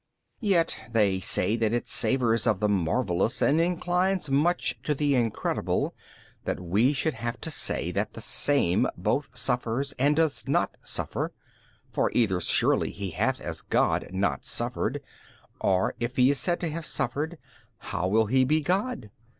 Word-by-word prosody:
B. 215 - -3
Yet 175 -4 +2
they 100 -5 +2
say 95 +3 +1
that 115 -1 +1
it 120 - -1
savours 115 -4 +2
of 105 - +2
the 105 - +2
marvellous 100 +3 0
and 155 +4 +3
inclines 180 -1 0
much 165 +6 +1
to 150 - -1
the 145 0 +1
incredible, 120 -4 0 0.5
that - - -2
we 100 +9 +2
should 150 +2 0
have 120 0 -4
to 160 - -3
say - - -1
that - - -2
the - - -9
Same 140 -12 +2
both - - -1
suffers 125 +3 -1
and 145 +3 +3
does 160 -2 0
not - - +1
suffer - - -3 0.6
61. - - -32
For - - +1
either 100 -7 +2
surely - - +2
He 100 -2 -5
hath 80 - 0
as - - -5
God - - +1
not 95 -7 -1
suffered - - -2 0.6
or 95 -1 +1
if 120 +1 -3
He 130 +2 +5
is 140 - -1
said 175 -1 0
to 170 - -1
have 160 +1 -5
suffered, 150 +7 -2 0.4
how 90 -3 -3
will 110 +3 +3
He 130 +5 +3
be 155 +4 +2
God? 185 - -1
125 Hz, 165 wpm, -27 LUFS, 105-155 Hz, 0.6 s, He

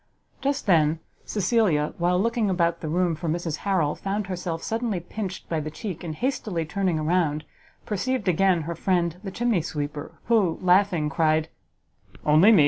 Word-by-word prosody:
Just 280 0 -1
then 160 -5 +4 0.3
Cecilia, 195 -7 +1
while 180 +1 +2
looking 230 0 +1
about 170 -2 +1
the 160 - -4
room 175 +1 +1
for 160 +1 -3
Mrs 165 -1 -2
Harrel, 180 -7 +1
found 200 +1 -3
herself 180 -3 -4
suddenly 225 -4 -1
pinched 185 +2 -6
by 165 - -1
the 155 0 -4
cheek, 180 +2 -6
and 160 -3 -4
hastily 215 - -1
turning 180 -1 0
round, 155 -3 +1 0.4
perceived 215 +2 -1
again 180 0 +3
her 170 +3 -3
friend 170 0 0
the 195 - -4
chimney 230 -2 +1
sweeper, 150 +1 -5
who, 210 -8 +3
laughing, 180 -3 +4
cried, 155 0 +2 0.8
"Only 155 +8 +7
me! 215 - +7
180 Hz, 160 wpm, -25 LUFS, 160-200 Hz, 0.8 s, Only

